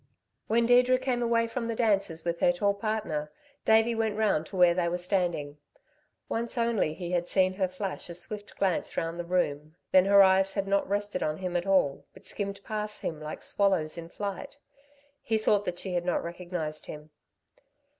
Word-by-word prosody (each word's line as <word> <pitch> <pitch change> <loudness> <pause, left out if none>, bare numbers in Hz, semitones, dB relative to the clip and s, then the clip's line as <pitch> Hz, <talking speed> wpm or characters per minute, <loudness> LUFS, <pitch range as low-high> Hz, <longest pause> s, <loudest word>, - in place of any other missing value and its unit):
When 235 +1 +3
Deirdre 250 +1 +5
came 255 -1 -1
away 230 -1 +2
from 230 0 -3
the 230 - -2
dancers 195 -8 0
with 170 0 -1
her 265 - +4
tall 205 -7 +1
partner, 200 -8 -3 0.3
Davey 225 +1 +4
went 220 -2 -1
round 200 -8 +1
to - - -10
where 180 -2 +6
they 170 -1 0
were 175 - -1
standing. 175 -6 -1 0.7
Once 235 +2 -3
only 230 -9 +1
he 175 -1 -5
had 175 -1 0
seen 185 0 +2
her 190 0 0
flash 185 0 -5
a 170 - -5
swift 205 +4 -8
glance 190 -3 -1
round 165 +1 -2
the - - -2
room, 155 -3 -1 0.2
then 185 0 +6
her 200 0 +7
eyes 190 0 +4
had 195 -1 -2
not 200 -1 +1
rested 205 -2 -2
on 155 0 -1
him 180 -1 -4
at 175 +2 -1
all, 185 -8 +2
but - - -16
skimmed 200 -1 -4
past 210 -1 -5
him 155 -2 -4
like 155 0 -7
swallows 190 -6 +1
in 170 -1 -8
flight. 200 +9 -6 0.6
He 220 - 0
thought 210 -1 +2
that 175 - -3
she 185 0 -4
had 175 -1 0
not 180 - 0
recognised 170 -3 -5
him. 150 0 -9
190 Hz, 195 wpm, -28 LUFS, 170-215 Hz, 0.7 s, her